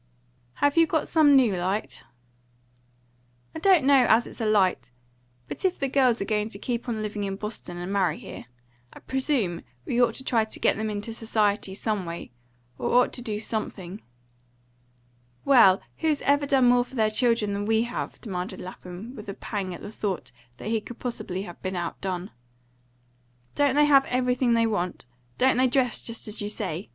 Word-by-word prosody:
"Have 285 +2 +1
you 330 0 +6
got 315 -2 0
some 300 -3 +5
new 245 -7 +4
light?" 180 - -2 1.5
"I 320 - -5
don't 355 -5 +4
know 270 -3 +5
as 230 +2 +5
it's - - -11
light. 210 - +2 0.6
But - - -7
if 375 -1 +1
the 275 - -1
girls 255 -3 +3
are 195 - -2
going 210 0 -1
to 200 - -6
keep 240 +3 -3
on 220 -2 -2
living 210 -1 -3
in 195 -1 -2
Boston 210 -4 -6
and 175 +3 -4
marry 185 -6 +1
here, - - -9 0.5
I - - -13
presume 260 - -1 0.2
we 245 - +1
ought 230 -2 +3
to 265 - -6
try 230 -4 +2
to 220 - -8
get - - +3
them 220 +1 -2
into 210 +2 -4
society, 210 -3 0
some 210 -4 -2
way; 170 -5 -7 0.5
or - - -1
ought 250 - +4
to 245 - -7
do 215 -4 -3
something." 210 -3 -4 1.4
"Well, 235 -9 +6
who's 315 -3 0
ever 285 0 +2
done 265 -3 +4
more 245 0 +5
for 255 - -14
their 220 -2 +2
children 230 -3 +1
than 200 0 -2
we 225 0 +3
have?" 240 +1 -5
demanded 185 -5 -5
Lapham, 185 +6 -9
with 210 -4 -9
a 195 - -5
pang 195 -3 -4
at 175 - -8
the - - -7
thought 200 - -4 0.3
that - - -6
he 225 -1 0
could 240 +3 -10
possibly 195 -6 -4
have 175 -4 -11
been 185 0 -3
out 175 -1 -4
done. 185 -1 -4 1.2
"Don't 285 -2 +2
they 295 0 +5
have 275 -2 +5
everything 250 -1 +1
they 230 0 +3
want? 180 - -2 0.3
Don't 260 -1 +3
they 260 0 +4
dress 250 -1 +1
just 230 -1 -4
as 210 0 -3
you 205 - -3
say? 195 -3 -4
220 Hz, 190 wpm, -26 LUFS, 195-255 Hz, 1.5 s, you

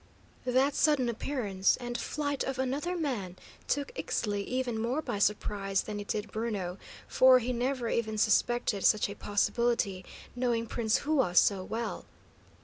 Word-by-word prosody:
That 260 +3 +3
sudden 285 -6 +2
appearance 215 -6 0
and 240 -1 -5
flight 285 +1 -2
of 270 -1 -3
another 280 +8 -1
man 235 - -3 0.3
took 285 - -1
Ixtli 205 - -2
even 250 -3 -2
more 245 +6 0
by 210 -9 -3
surprise 200 -1 0
than 210 -1 -5
it 205 - -7
did 210 - -3
Bruno, 205 -5 -3 0.3
for 260 0 +6
he 250 +1 -1
never 250 0 -1
even 220 -2 -1
suspected 215 -1 +2
such 215 - +4
a - - -5
possibility, 205 -2 0 0.3
knowing 240 -2 0
Prince 225 +2 0
Hua 275 - +2
so 190 +2 +4
well. 225 +4 -4
235 Hz, 145 wpm, -30 LUFS, 205-260 Hz, 0.3 s, for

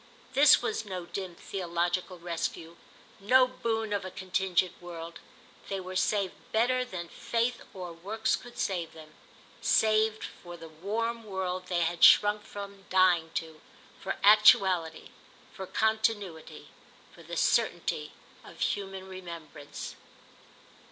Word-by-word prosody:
This 290 +2 +7
was 445 0 -1
no 185 -4 -6
dim 185 -1 -6
theological 175 0 -2
rescue, 170 -1 -4 0.4
no 255 +6 +5
boon 225 -4 -2
of 200 -1 -1
a 185 - -5
contingent 185 -1 0
world; 170 -1 -8 0.5
they 195 - -2
were 185 0 -7
saved 200 0 +1 0.2
better 250 +3 +2
than 180 -8 -6
faith 235 +6 -2
or 180 -3 -7
works 215 +6 -1
could 245 -1 -12
save 175 -4 -2
them, 155 -1 -13 0.5
saved 220 0 +3
for 175 -1 -9
the 165 -1 -11
warm 225 +8 -3
world 185 -3 -4
they 175 -2 0
had 170 +1 -1
shrunk_ 210 0 +7
_from 200 -1 -9
dying 180 -3 +4
to, 160 -1 -4 0.4
for 195 - -4
actuality, 190 -5 +5 0.4
for 190 -3 -7
continuity, 220 -7 -1 0.4
for - - -15
the - - -7
certainty - - +1 0.3
of - - -14
human 195 -1 -2
remembrance. 170 -6 -8
190 Hz, 125 wpm, -29 LUFS, 175-215 Hz, 0.5 s, This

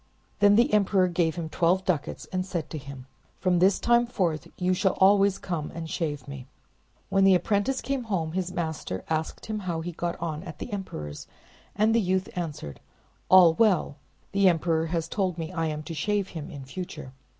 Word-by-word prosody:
Then 205 0 +6
the 240 +6 +3
emperor 195 -2 +3
gave 170 -3 0
him 170 -2 -4
twelve 175 +4 +1
ducats, 160 -4 -2
and 185 0 0
said 170 -5 -4
to 155 - -4
him— 135 -2 -10 0.3
"From 180 -2 +2
this 190 +2 +4
time 240 0 +3
forth 175 -10 -1
you 180 0 +1
shall 190 +1 +2
always 195 0 +5
come 165 -5 -4
and 165 -1 -5
shave 145 -5 -3
me. 135 -2 -8 0.6
When 195 0 +3
the 195 -1 +7
apprentice 205 +8 0
came 265 -1 -2
home, 175 -7 -1
his 180 +1 -2
master 160 - -4
asked 160 0 -2
him 215 -1 -3
how 175 -4 -3
he 175 +2 -4
got 170 +1 -3
on 160 -2 -3
at 170 -4 -9
the 230 - -7
emperor's, 75 - -6 0.5
and 215 +2 +3
the 230 - +4
youth 185 0 0
answered— 155 - -5 0.5
"All 180 -3 +8
well; 205 -1 +3
and - - -11 0.5
the 190 - +7
emperor 165 -1 +1
has 165 0 -2
told 185 -1 -1
me 165 -1 -4
that 185 - -10
I 165 - +1
am 155 0 -4
to 165 - -6
shave 205 +3 -1
him 160 -3 -7
in 140 -2 -9
future." 135 -3 -7
175 Hz, 200 wpm, -27 LUFS, 160-195 Hz, 0.6 s, All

